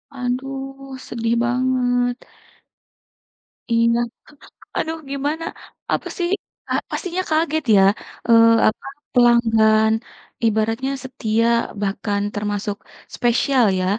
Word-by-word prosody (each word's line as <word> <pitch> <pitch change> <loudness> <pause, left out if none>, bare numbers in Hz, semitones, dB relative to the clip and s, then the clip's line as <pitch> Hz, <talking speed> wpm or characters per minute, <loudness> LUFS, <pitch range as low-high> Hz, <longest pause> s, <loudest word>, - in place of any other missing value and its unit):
Aduh, 270 +1 -5
sedih 230 0 -1
banget. 245 0 +1 1.6
Iya, 230 0 +3 0.8
aduh 320 0 -2
gimana, 290 +4 -2 0.5
apa - - -1
sih, 350 - 0 0.4
ah - - +2
pastinya 365 0 -2
kaget 315 -1 +1
ya, 195 - +6 0.5
eee, 230 -1 +7 0.2
apa, 215 - -1 0.3
pelanggan 225 -3 +4 0.5
ibaratnya 225 +4 0
setia 230 -4 -1 0.4
bahkan 200 0 -1
termasuk 205 0 -2 0.4
spesial 245 +1 +2
ya. 185 - 0
240 Hz, 90 wpm, -21 LUFS, 225-270 Hz, 1.6 s, eee